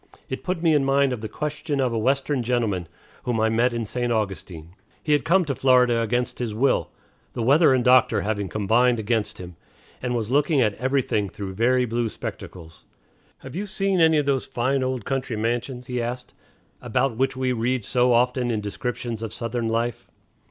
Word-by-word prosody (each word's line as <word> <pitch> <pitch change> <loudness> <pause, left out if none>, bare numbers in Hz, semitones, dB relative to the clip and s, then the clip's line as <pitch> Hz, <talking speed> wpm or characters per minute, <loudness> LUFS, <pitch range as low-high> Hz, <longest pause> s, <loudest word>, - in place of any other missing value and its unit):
It 130 - -5
put 180 -2 -3
me 165 -2 +4
in 145 -2 +3
mind 135 -1 +2
of 115 - -5
the 110 - -5
question 150 -1 -3
of 130 -3 +1
a - - 0
Western 135 +3 +1
gentleman 115 -7 -1 0.3
whom 120 -2 -1
I 110 0 +3
met 120 +3 +2
at 115 -1 -3
St. 120 +3 -2
Augustine. 95 -6 -4 0.3
He 150 - -1
had 145 -4 +2
come 180 +5 +3
to 140 - -1
Florida 125 -3 +3
against 120 +2 -1
his 115 -4 -3
will, 130 +4 +1 0.4
the 115 - -3
weather 145 +5 +5
and 130 -2 +2
the 125 - +3
doctor 125 -2 +5
having 100 -2 -2
combined 115 +4 +2
against 110 0 -1
him, 90 -2 -10 0.4
and 125 -1 -2
was 115 -1 -2
looking 145 +2 +3
at 110 -5 +3
everything 130 -5 0
through 95 -1 -7
very 125 +5 +2
blue 120 0 -1
spectacles. 85 -6 -9 0.6
"Have - - -9
you 205 +3 -3
seen 195 -2 +1
any 160 -1 +5
of 145 - +1
those 135 -2 0
fine 130 +3 0
old 130 -4 -2
country 130 -3 -2
mansions," 120 +3 -2
he 125 0 -3
asked, 125 +1 -5 0.5
"about 125 +1 0
which 135 0 0
we 130 -1 0
read 120 -1 -1
so 125 0 +2
often 125 +1 +2
in 110 -2 0
descriptions 115 +2 -4
of 115 -2 -4
Southern, 115 0 -3
life?" 115 +1 -2
125 Hz, 195 wpm, -24 LUFS, 115-135 Hz, 0.6 s, weather